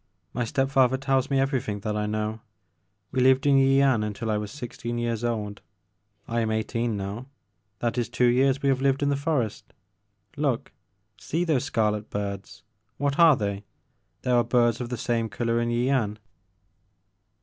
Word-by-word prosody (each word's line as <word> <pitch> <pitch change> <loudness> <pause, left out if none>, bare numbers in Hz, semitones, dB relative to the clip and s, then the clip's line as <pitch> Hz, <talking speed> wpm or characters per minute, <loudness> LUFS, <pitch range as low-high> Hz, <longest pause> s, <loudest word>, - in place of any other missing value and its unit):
My 120 - -1
step 135 +3 0
father 130 -1 +4
tells 135 -1 0
me 135 -1 +2
everything 130 -7 -1
that 105 0 -2
I 105 0 -1
know. 110 +1 -2 0.7
We 130 - -1
lived 130 +1 +4
in 140 -1 +5
Yian 135 -3 +4
until 105 +1 -3
I 105 - +1
was 105 -1 -5
sixteen 120 -3 -5
years 120 -1 -2
old. 105 -4 -3 0.7
I 115 0 -1
am 110 -1 0
eighteen 110 +1 -1
now; 100 +6 -5 0.5
that 120 +1 0
is 120 - -2
two 125 +1 +1
years 130 +3 +3
we 140 - +3
have 130 -1 +1
lived 135 +1 +2
in 145 - +2
the 140 - +2
forest. 140 -7 -1 0.7
Look! 140 -3 -1 0.2
— 100 +2 -48
see 165 +3 +1
those 150 -6 +1
scarlet 105 -6 0
birds 100 -1 -5
I 110 0 -48
What 140 +2 0
are 165 -3 +8
they? 100 -3 -3 0.6
There 125 - +1
are 120 - +4
birds 120 0 +2
of 120 - -4
the 125 - -3
same 115 0 -1
color 115 0 -1
in 120 - -1
Yian. 120 -3 0
120 Hz, 180 wpm, -26 LUFS, 110-135 Hz, 0.7 s, are